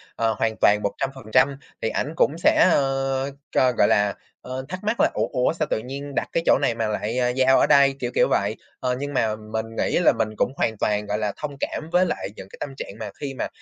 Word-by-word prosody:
ờ, 115 -1 +1
hoàn 110 -1 0
toàn 105 0 +5
100%. 135 +3 0 0.3
Thì 110 - 0
ảnh 155 - -2
cũng 150 - +2
sẽ, 175 - +4
ơ, 135 0 0 0.2
cho 130 -1 +3
gọi 110 - +3
là, 105 -1 +2 0.3
ơ, 130 +1 -6
thắc 185 +2 -6
mắc 215 +3 -1
là - - +4
"ủa, - - 0
ủa 125 +4 +1
sao 155 -3 -2
tự - - 0
nhiên 140 +4 -7
đặt - - 0
cái 165 - 0
chỗ - - +5
này 115 - +1
mà 115 -2 -1
lại, 110 +3 -2
à, 125 0 +2
giao 130 +1 +4
ở - - +4
đây," 140 -1 +5
kiểu, 125 -1 -3
kiểu - - +4
vậy. 100 +2 +1 0.2
Ờ, 125 -1 0
nhưng 145 0 -4
mà 110 -4 +1
mình 110 +1 -4
nghĩ - - +1
là 175 - +5
mình 110 -1 0
cũng - - +1
hoàn 110 -2 0
toàn, 105 0 0
gọi 105 +1 -2
là, 105 -2 -2
thông 145 -2 -5
cảm 155 - -4
với 180 +1 +4
lại - - -3
những 95 - -10
cái - - -13
tâm 145 - -4
trạng - - -6
mà - - -5
khi 140 -2 -4
mà - - -3
130 Hz, 250 wpm, -23 LUFS, 110-140 Hz, 0.3 s, toàn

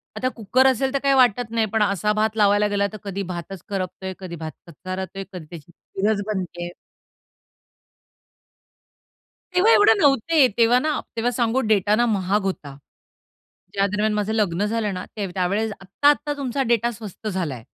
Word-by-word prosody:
आता 255 - -1
कुकर 250 +4 +3
असेल 265 +1 +1
तर 275 - +1
काही 275 0 +4
वाटत 245 -2 +3
नाही 225 -1 +1
पण 220 -1 +3
असा 205 +1 +1
भात 215 +1 0
लावायला 205 0 +4
गेला 200 0 0
तर - - -6
कधी 200 0 -4
भातच 175 +1 -6
करपतोय, 190 -1 -4
कधी 180 -3 -7
भात 160 -1 -6 0.2
कच्चा, 185 +4 -5
कधी 195 - -5 0.3
त्याची 170 -1 -11
खीरच 205 +4 -2
बनतेय. 175 -4 -4 2.9
तेव्हा 390 +6 +5
एवढे 415 - +6
नव्हते, 285 +1 +4
तेव्हा 235 +1 +5
ना 305 +3 -1 0.2
तेव्हा 235 +2 0
सांगू 240 +1 +1
डेटा 205 0 +3
ना 240 - +2
महाग 205 -2 +1
होता. 150 -8 -4 1.0
ज्या 200 0 +2
दरम्यान 210 +2 0
माझं 210 +1 -1
लग्न 205 -3 +1
झालं 215 -1 -1
ना 180 0 -5
त्यावेळेस 200 +2 -1
आत्ता-आत्ता 290 +9 +1
तुमचा 270 -1 -1
डेटा 235 0 +2
स्वस्त 215 -1 -9
झालाय. 160 - -3
210 Hz, 155 wpm, -22 LUFS, 190-235 Hz, 2.9 s, एवढे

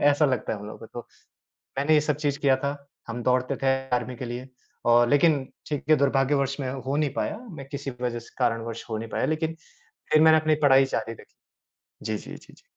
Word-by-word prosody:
ऐसा 145 +1 +3
लगता 130 -6 -1
है 105 - -3
हम 105 - -9
लोगों 105 - -9
को 115 - -10
तो। 120 +1 -9 0.7
मैंने 150 +3 +3
ये 150 - +6
सब 150 -1 0
चीज़ 145 -2 -1
किया 135 -2 +4
था, 140 +2 -2 0.3
हम 120 +1 -4
दौड़ते 125 +1 +1
थे - - +1 0.3
आर्मी 125 +1 -4
के 125 - -6
लिए 120 +2 -6 0.4
और 120 0 +5
लेक़िन 145 -1 +4 0.2
ठीक 145 -2 -3
है, 155 - +7
दुर्भाग्यवश 140 0 +2
में 130 -2 -2
हो 135 +1 -3
नहीं 150 -2 +1
पाया। 205 - -2
मैं 145 -6 -9
किसी 140 -1 -4
वजह 120 -1 -1
से 115 - -14
कारणवश 115 0 -1
हो 110 - -1
नहीं 115 +1 -6
पाया - - -1
लेक़िन 160 +1 -1 0.6
फ़िर 155 - +6
मैंने 160 0 +7
अपनी 155 0 +2
पढ़ाई 135 0 +6
जारी 115 -3 -3
रखी। - - -17 0.7
जी, 110 -1 -1
जी, - - -9
जी, - - -15
जी। - - -21
135 Hz, 220 wpm, -26 LUFS, 120-145 Hz, 0.7 s, है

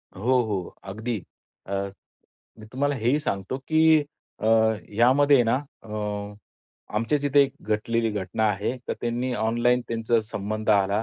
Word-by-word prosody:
हो, 125 +6 +2
हो. 100 -5 -4
अगदी. 110 +4 -4 0.5
अ, - - -8 0.9
मी 110 - -11
तुम्हाला 145 +2 0
हेही 125 +5 +2
सांगतो 100 -2 -3
की 160 -1 +5 0.4
अ, 110 - -2 0.5
यामध्ये 130 +4 +5
ना 115 0 +2 0.3
अ, - - -15 1.1
आमच्या 115 +7 +1
इथे 145 0 +5
एक 135 -1 -1
घटलेली 115 +2 0
घटना 105 +1 -2
आहे. 105 +5 -2
तर - - +1
त्यांनी 120 +2 -1
ऑनलाईन 120 +3 +2
त्यांचा 115 0 +1
संबंध 110 0 -5
आला. 100 +1 +3
115 Hz, 135 wpm, -25 LUFS, 105-130 Hz, 1.1 s, की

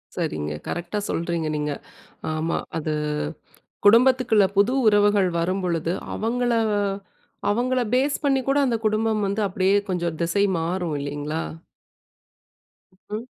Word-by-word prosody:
சரிங்க, 75 0 -2
கரெக்ட்டா 175 +4 -3
சொல்றீங்க 170 -1 -1
நீங்க. 150 0 -1 0.6
ஆமா. 160 +1 -1 0.2
அது 155 0 -2 0.9
குடும்பத்துக்குள்ள 230 -1 +5
புது 205 +5 +4
உறவுகள் 205 -2 +4
வரும்பொழுது, 175 -2 -1 0.2
அவங்கள 245 +2 0 1.0
அவங்கள 250 +4 +1
ஃபேஸ் 270 +3 +2
பண்ணி 275 -2 +3
கூட 275 +1 +2
அந்த 245 -3 +1
குடும்பம் 215 0 +1
வந்து 200 +2 -1
அப்பிடியே 190 +1 +2
கொஞ்சம் 175 -3 -1
திசை 170 +4 +1 0.2
மாறும் 170 0 -2
இல்லேங்களா! 145 +3 -3 1.7
ம். 215 +3 -4
195 Hz, 110 wpm, -24 LUFS, 165-225 Hz, 1.7 s, குடும்பத்துக்குள்ள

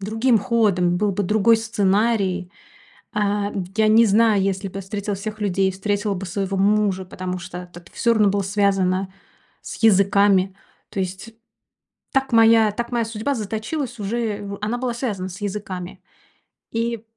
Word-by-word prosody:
другим 225 +4 +2
ходом. 195 -6 +1
Был 210 -1 +1
бы 205 - -1
другой 215 +3 +4
сценарий. 200 -3 0 0.6
А, 205 0 0 0.3
я 215 -1 +4
не 225 +2 +6
знаю, 215 -1 +4
если 195 +1 -1
бы 195 +1 -6
встретила 200 +1 -4
всех 215 +2 -6
людей, 195 -1 +1
встретила 205 +2 -1
бы 195 +1 -5
своего 195 +1 -3
мужа, 200 -1 +2
потому 185 0 -5
что 180 +1 -8
это 175 - -10
всё 235 -1 +2
равно 210 -2 +3
было 200 0 0
связано 195 -1 0 0.5
с - - -9
языками. 200 -2 +4 0.4
То 195 - -5
есть 190 +5 -5 0.8
так 270 -2 0
моя 225 -1 +6
так 235 +3 -5
моя 235 -1 +1
судьба 225 +5 -2
заточилась 225 +4 -4
уже 210 0 -2
в 200 0 -6
она 225 +3 -1
была 245 -1 -2
связана 210 -7 -3
с 190 +3 -10
языками. 190 -3 -5 0.7
И 230 -1 -2
205 Hz, 155 wpm, -22 LUFS, 190-225 Hz, 0.8 s, не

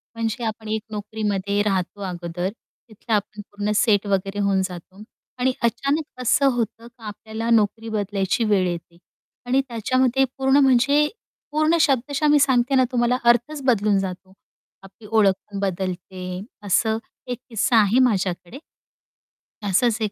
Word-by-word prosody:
म्हणजे 230 +1 -2
आपण 220 0 -4
एक 220 0 -1
नोकरीमध्ये 205 -1 -2
राहतो 195 -1 -2
अगोदर 175 -1 -4
तिथलं 225 +1 -9
आपण 210 0 -3
पूर्ण 205 +1 -2
सेट 210 -3 +3
वगैरे 195 +1 -1
होऊन 200 -1 +2
जातो 185 +2 -10 0.4
आणि 260 +1 +2
अचानक 275 +6 +1 0.2
असं 255 +3 +3
होतं 230 0 -3
का 235 -1 -19
आपल्याला 220 +2 -5
नोकरी 225 0 +2
बदलायची 205 +1 -1
वेळ 205 -4 +2
येते 170 -1 -6 0.5
आणि 260 +2 +2
त्याच्यामध्ये 255 +3 +1
पूर्ण 265 +1 +3
म्हणजे 270 +3 +4 0.4
पूर्ण 310 +2 +2
शब्दशः 280 +2 +1
मी 295 - +5
सांगते 265 -1 +3
ना 260 - +5
तुम्हाला 245 0 +2
अर्थच 240 +6 +2
बदलून 210 -5 +3
जातो. 190 0 -6 0.5
आपली 200 +3 -15
ओळख 210 -3 +5 0.2
पण 200 - -4
बदलते. 185 -1 -4 0.2
असं 220 +3 +2 0.3
एक 245 -1 -3
किस्सा 230 +1 +2
आहे 215 +3 +4
माझ्याकडे. 195 -1 -1 1.1
असंच 220 +4 +2
एक 215 -2 0
220 Hz, 140 wpm, -22 LUFS, 195-245 Hz, 1.1 s, मी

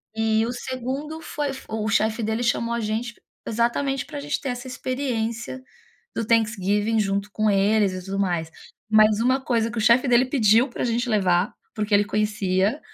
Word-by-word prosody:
E 220 0 +2
o 235 - -2
segundo 260 +5 -5
foi 295 -2 -3
f 270 -1 -7
o 220 0 -2
chefe 220 +1 +1
dele 220 +2 -1
chamou 235 0 0
a - - -2
gente, 225 +2 -3 0.3
exatamente 250 +4 0
pra 290 - -7
gente 290 +1 -2
ter 275 - -4
essa 245 +1 -5
experiência 255 -1 -3 0.5
do 230 - -1
Thanksgiving 215 -1 +1
junto 200 0 -1
com 215 +1 +1
eles 200 0 +3
e 185 0 -6
tudo 195 +1 -4
mais. 175 -4 -1 0.4
Mas 215 0 +5
uma 255 +3 +3
coisa 235 -4 0
que 235 - -9
o - - 0
chefe 235 +5 +4
dele 245 +1 +5
pediu, 245 -2 +3
pra - - -4
gente 240 +1 0
levar, 185 -2 +2 0.2
porque 210 0 -3
ele 205 0 +5
conhecia, 210 +2 0
225 Hz, 180 wpm, -24 LUFS, 210-250 Hz, 0.5 s, Mas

